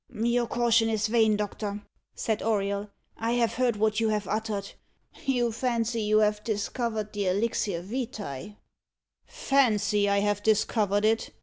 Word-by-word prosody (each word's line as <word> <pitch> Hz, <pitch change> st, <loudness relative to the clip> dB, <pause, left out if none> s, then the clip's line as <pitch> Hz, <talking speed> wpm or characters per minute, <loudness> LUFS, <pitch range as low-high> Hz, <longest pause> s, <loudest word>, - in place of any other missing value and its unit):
"Your 235 Hz, +1 st, +1 dB
caution 230 Hz, -1 st, +2 dB
is 220 Hz, -1 st, 0 dB
vain, 220 Hz, -1 st, +3 dB
doctor," 205 Hz, 0 st, -4 dB, 0.3 s
said 220 Hz, -1 st, -1 dB
Auriol. 200 Hz, -1 st, -1 dB, 0.3 s
"I 230 Hz, +1 st, -1 dB
have 240 Hz, -2 st, +1 dB
heard 250 Hz, -2 st, +1 dB
what 215 Hz, +1 st, +1 dB
you 225 Hz, -1 st, +2 dB
have 210 Hz, -2 st, -1 dB
uttered. 210 Hz, -1 st, -3 dB, 0.6 s
You 245 Hz, -3 st, +2 dB
fancy 235 Hz, -1 st, -1 dB
you 215 Hz, 0 st, +2 dB
have 210 Hz, 0 st, +1 dB
discovered 220 Hz, 0 st, -2 dB
the 205 Hz, -2 st, -1 dB
elixir 195 Hz, -2 st, 0 dB
vitæ." 205 Hz, -, -5 dB, 0.7 s
"Fancy 210 Hz, -6 st, +2 dB
I 200 Hz, -, +2 dB
have 205 Hz, 0 st, 0 dB
discovered 210 Hz, -1 st, +2 dB
it!" 220 Hz, +1 st, +1 dB
215 Hz, 140 wpm, -27 LUFS, 205-230 Hz, 0.7 s, vain